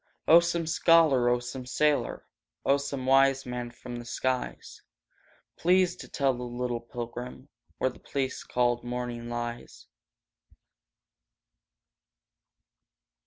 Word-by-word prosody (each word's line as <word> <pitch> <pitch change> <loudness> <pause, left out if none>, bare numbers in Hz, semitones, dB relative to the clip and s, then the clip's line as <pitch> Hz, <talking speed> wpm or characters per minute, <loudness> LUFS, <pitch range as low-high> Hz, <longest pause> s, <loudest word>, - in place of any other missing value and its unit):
Oh, 165 +2 +9
some 170 -1 -1
scholar! 160 -6 +4
Oh, 120 - +3
some 125 +1 -6
sailor! 150 +3 0 0.4
Oh, 140 - +4
some 140 -2 -4
wise 135 0 +4
man 125 -1 -4
from 120 0 -9
the 120 - -8
skies! 130 +1 -3 0.8
Please 180 +1 +3
to - - -9
tell 140 -2 +1
a 125 -1 -6
little 120 0 -3
pilgrim 120 +3 -7 0.3
Where 130 - 0
the - - -16
place 135 -2 -3
called 120 -1 0
morning 120 -1 -4
lies! 120 0 -6
125 Hz, 115 wpm, -28 LUFS, 120-140 Hz, 0.8 s, Oh